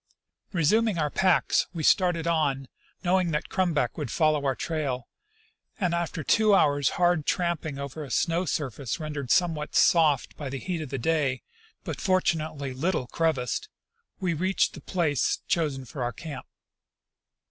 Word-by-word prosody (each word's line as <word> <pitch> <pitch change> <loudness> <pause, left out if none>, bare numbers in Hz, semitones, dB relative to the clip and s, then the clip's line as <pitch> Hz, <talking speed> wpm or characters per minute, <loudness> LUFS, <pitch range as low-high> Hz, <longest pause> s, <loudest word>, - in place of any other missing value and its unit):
Resuming 210 +4 +2
our 150 -2 0
packs, 185 -2 +2
we 160 - -3
started 175 -1 +3
on, 145 -5 0 0.4
knoAAdng 180 -1 +2
that 150 - -2
Crum 185 -2 +1
back 125 -1 0
would 145 -5 -3
follow 155 +2 +2
our 135 - +1
trail; 135 -7 -3 0.7
and 180 -4 +1
after 170 -2 -2
two 215 +5 +4
hours' 145 -6 +3
hard 175 -4 +2
tramping 170 -5 -1
over 140 +2 -6
a 140 - -9
snow 170 +7 +1
surface 140 -4 -3
rendered 150 -4 -5
somewhat 160 -2 +1
soft 155 -6 +4
by 145 -3 -5
the 135 - -4
heat 175 +2 -3
of 150 - -6
the 135 - -3
day, 135 -1 0 0.4
but - - -5
fortunately 155 -7 0
little 155 +1 -1
crevassed, 160 - -1 0.5
we 180 -4 0
reached 185 +4 +1
the - - -10
place 155 -7 0
chosen 145 -6 0
for 130 +3 -7
our 120 0 -1
camp. 140 -1 -8
155 Hz, 155 wpm, -27 LUFS, 140-175 Hz, 0.7 s, two